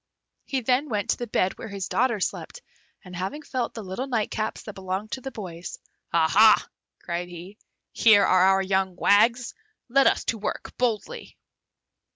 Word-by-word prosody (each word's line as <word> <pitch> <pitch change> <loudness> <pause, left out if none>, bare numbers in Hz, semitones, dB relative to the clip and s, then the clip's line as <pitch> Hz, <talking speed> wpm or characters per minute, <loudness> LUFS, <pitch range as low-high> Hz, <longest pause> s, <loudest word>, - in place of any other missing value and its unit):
He 265 -2 -2
then 255 +5 +1
went 210 -3 -1
to - - -1
the 240 - -5
bed 190 -3 0
where - - -6
his 200 -3 -5
daughters 235 -5 +1
slept, - - -10 0.4
and 180 -1 -10
having 195 - -4
felt 255 -4 -3
the 225 - -6
little 190 +8 -5
nightcaps 220 -3 -2
that 215 - -8
belonged 190 +2 -5
to 260 - -4
the 270 - -5
boys. 180 -8 -8 0.3
"Aha!" 170 +7 +5 0.4
cried 175 +1 -3
he. 180 +4 -11 0.3
"Here 210 -3 +5
are 185 0 +4
our 195 0 +4
young 190 -1 0
wags! 230 +6 +3 0.4
Let 275 +3 +4
us - - +2
to 225 - -2
work 205 - -5
boldly!" 250 - -2
210 Hz, 170 wpm, -25 LUFS, 190-240 Hz, 0.4 s, Aha